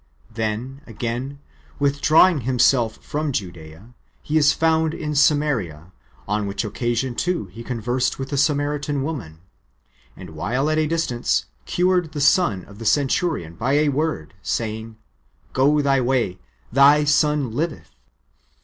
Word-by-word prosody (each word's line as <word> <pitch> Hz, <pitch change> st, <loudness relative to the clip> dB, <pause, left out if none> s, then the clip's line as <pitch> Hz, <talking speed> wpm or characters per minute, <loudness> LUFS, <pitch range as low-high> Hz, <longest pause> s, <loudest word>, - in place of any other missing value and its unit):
Then, 115 Hz, +5 st, -3 dB
again, 120 Hz, +5 st, -4 dB, 0.4 s
withdrawing 145 Hz, +3 st, +4 dB
Himself 120 Hz, -2 st, +2 dB
[from 150 Hz, 0 st, -2 dB
Judsea], 85 Hz, 0 st, -7 dB, 0.3 s
He 150 Hz, -, -3 dB
is 145 Hz, -2 st, +5 dB
found 160 Hz, +1 st, +1 dB
in 150 Hz, -2 st, -4 dB
Samaria; 140 Hz, -, +1 dB, 0.4 s
on 105 Hz, 0 st, -1 dB
which 100 Hz, +3 st, -3 dB
occasion, 120 Hz, +3 st, -2 dB
too, 175 Hz, -, -1 dB
He 115 Hz, +4 st, -9 dB
conversed 125 Hz, +1 st, -1 dB
with 135 Hz, 0 st, -5 dB
the 145 Hz, -, -3 dB
Samaritan 145 Hz, 0 st, 0 dB
woman, 110 Hz, -, -6 dB, 0.8 s
and -, -, -10 dB
while 120 Hz, -, -1 dB
at 155 Hz, -, +1 dB
a 155 Hz, -, +1 dB
distance, 160 Hz, -7 st, 0 dB, 0.2 s
cured 180 Hz, -3 st, +1 dB
the 150 Hz, -, -4 dB
son 140 Hz, -, +2 dB
of 100 Hz, +1 st, -15 dB
the 115 Hz, -, -7 dB
centurion 140 Hz, -, 0 dB
by 120 Hz, +11 st, -1 dB
a 150 Hz, +1 st, +3 dB
word, 145 Hz, -, -2 dB
saying, 110 Hz, +1 st, -4 dB, 0.3 s
" -, -, -36 dB
Go 145 Hz, +3 st, +3 dB
thy 135 Hz, -1 st, +2 dB
way, 120 Hz, -8 st, 0 dB, 0.3 s
thy 140 Hz, +4 st, +6 dB
son 150 Hz, -3 st, +2 dB
livetli." 155 Hz, +5 st, -2 dB
135 Hz, 140 wpm, -22 LUFS, 115-150 Hz, 0.8 s, thy